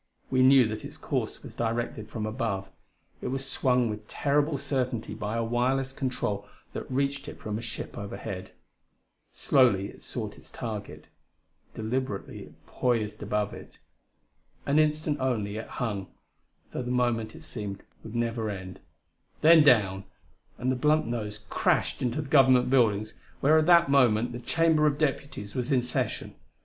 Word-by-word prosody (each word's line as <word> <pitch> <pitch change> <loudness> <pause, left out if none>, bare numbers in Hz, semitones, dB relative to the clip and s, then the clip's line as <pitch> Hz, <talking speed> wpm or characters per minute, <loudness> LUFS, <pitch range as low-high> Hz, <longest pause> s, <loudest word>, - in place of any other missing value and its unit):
We 130 - +3
knew 130 -2 +7
that 110 0 -5
its - - -8
course - - -3
was - - -9
directed 115 -2 -2
from 110 -1 -4
above; 110 -3 -2 0.5
it - - -3
was 135 +1 -2
swung 125 -2 +2
with 105 -1 -5
terrible 145 +1 +1
certainty 125 -4 -2
by 105 +1 -3
a 115 - +1
wireless 130 +3 0
control 105 -7 -2 0.3
that - - -6
reached 140 +1 -1
it - - -8
from 105 -1 -5
a 110 - -3
ship 115 -1 -6
overhead. 100 -2 -6 0.8
Slowly 105 -7 +3
it - - -14
sought - - -5
its - - -16
target: 105 -3 -6 0.7
deliberately 110 -1 -3
it - - -20
poised 110 -4 -1
above 105 -1 -1
it. - - -11 0.9
An 145 +2 +3
instant, 155 -1 +1
only, 110 -6 -1
it 110 - -5
hung, 105 -6 -3 0.6
though - - -3
the 125 - -5
moment, 120 -3 0
it - - -12
seemed, 100 +5 -6 0.2
would 115 +1 -8
never 115 -2 -1
end 95 -2 -7 0.6
then 160 +1 +8
down! 100 -8 +4 0.5
and 130 +1 0
the - - +1
blunt 150 +4 +3
nose 105 -2 -4
crashed - - +1
into 125 +5 -1
the - - -9
Government 130 -3 +5
buildings 110 -4 +2 0.2
where 155 +3 +5
at 155 - +1
that 170 -2 +7
moment 120 -4 +4
the 120 - -6
Chamber 155 +4 +3
of 145 -1 +1
Deputies 140 -8 -2
was 125 +2 -2
in 130 -3 +3
session 125 - -2
120 Hz, 160 wpm, -28 LUFS, 105-135 Hz, 0.9 s, then